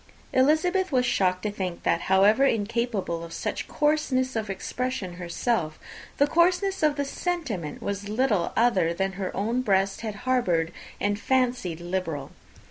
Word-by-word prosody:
Elizabeth 315 +7 +3
was 250 -2 +3
shocked 185 -6 +1
to 210 - -1
think 185 -4 -4
that, 170 - +2
however 200 +7 +5
incapable 220 -7 0
of 165 - -9
such - - -3
coarseness 295 -4 +1
of 220 -2 -2
expression 195 -1 -3
herself, 170 -2 -1 0.4
the 285 - +5
coarseness 360 +5 +2
of 305 -2 +3
the 285 -1 -1
sentiment 275 - -3
was 200 0 -3
little 215 -5 +1
other 190 -8 +3
than 195 +2 0
her 190 0 -4
own 230 +5 0
breast 195 -4 +1
had 220 -2 -3
formerly - - -12
harboured 180 -11 +1 0.3
and 205 0 0
fancied 245 -10 0
liberal! 175 -5 -3
215 Hz, 150 wpm, -26 LUFS, 185-260 Hz, 0.4 s, however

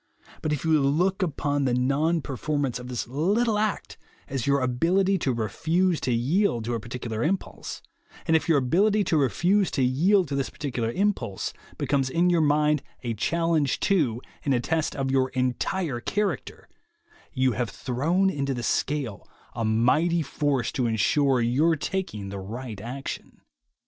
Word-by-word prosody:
But 155 - -1
if 150 +1 -2
you 160 -2 +4
look 175 +8 +1
upon 145 -4 0
the 125 -2 +2
non 145 +6 +1
performance 140 -2 -2
of 125 - -8
this 120 -4 -4
little 205 - +1
act 215 -1 -2 0.3
as 135 -2 -3
your 140 -1 +3
ability 180 +10 +2
to 135 - 0
refuse 160 - 0
to 125 - 0
yield 120 - +1
to 120 - -2
a 115 - -1
particular 115 -1 -5
impulse, 185 +7 -3 0.4
and 160 - +3
if 160 - +1
your 160 - +5
ability 200 +11 +3
to 165 - +1
refuse 175 - +2
to 135 - 0
yield 175 +9 +3
to 140 - -2
this 135 -2 -1
particular 120 -6 -3
impulse 130 - -1 0.2
becomes 135 -2 0
in 175 +5 +2
your 170 -2 +3
mind 150 -1 +3 0.2
a 120 -2 -1
challenge 160 +4 +1
to 150 - +2 0.2
and 140 -2 +2
a - - +2
test 160 +5 -1
of 135 -1 -1
your 130 -1 +2
entire 130 +3 -1
character, 205 +11 -3 0.6
you 130 -2 +2
have 120 -1 -2
thrown 165 +10 0
into 140 -3 -2
the 120 - -4
scale 135 -5 -2 0.2
a 115 - -3
mighty 125 +10 +2
force 140 -4 -1
to 125 -3 0
ensure 130 +4 +2
your 140 +8 +3
taking 140 - -4
the 100 0 -5
right 110 +2 -7
action. 130 +5 -7
140 Hz, 165 wpm, -26 LUFS, 125-170 Hz, 0.6 s, your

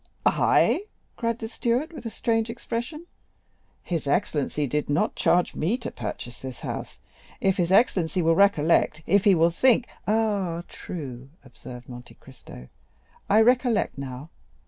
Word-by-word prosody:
"I," 405 - +3 0.3
cried 230 -1 -1
the 225 - -5
steward 240 +7 -1
with 275 - -7
a - - -3
strange 225 0 -1
expression. 240 +7 -5 0.8
"His 165 -5 -3
excellency 150 -2 0
did 150 +2 -2
not 145 +2 +1
charge 175 0 +2
me 190 +10 0
to 240 - -6
purchase 120 +2 -7
this 130 -2 -8
house. - - -6 0.4
If 190 -1 +1
his 175 -1 0
excellency 185 -5 +3
will 165 +1 +4
recollect—if 170 0 +3
he 200 -3 +6
will 165 +1 +3
think——" 250 +6 +3 0.2
"Ah, 200 -6 0
true," 135 -6 -8 0.2
observed 125 -1 -11
Monte 125 0 -11
Cristo; 115 - -14 0.6
"I 210 +2 +6
recollect 245 - +2
now. 135 +3 -7
180 Hz, 140 wpm, -25 LUFS, 145-225 Hz, 0.8 s, he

